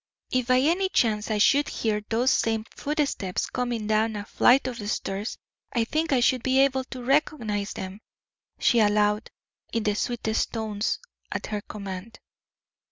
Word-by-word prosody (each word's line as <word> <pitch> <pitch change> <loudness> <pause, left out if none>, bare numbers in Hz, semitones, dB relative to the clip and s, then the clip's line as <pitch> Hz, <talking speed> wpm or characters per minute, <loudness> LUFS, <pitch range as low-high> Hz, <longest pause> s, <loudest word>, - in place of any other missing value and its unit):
"If 255 -2 +1
by 255 0 +4
any 350 +7 +2
chance 215 - +1
I 215 - +1
should 285 +7 +4
hear 215 -2 -1
those 240 +4 +2
same 225 -1 +1
footsteps 280 -11 -1
coming 245 -3 -2
down 215 +1 +1
a 205 0 -5
flight 255 +5 +4
of 250 -2 -4
stairs, 200 +1 -3 0.4
I 235 - +2
think 310 +7 -1
I 260 -3 +3
should 250 +1 +3
be 260 +2 +1
able 265 -1 +2
to 255 -1 -8
recognise 240 -7 0
them," 190 +3 -7 0.6
she 240 - +3
allowed, 210 0 +2 0.4
in 230 - -1
the 210 - +2
sweetest 220 0 -1
tones 215 -2 -1 0.3
at - - -3
her 210 -1 -3
command. 200 +1 -7
225 Hz, 160 wpm, -26 LUFS, 210-255 Hz, 0.6 s, by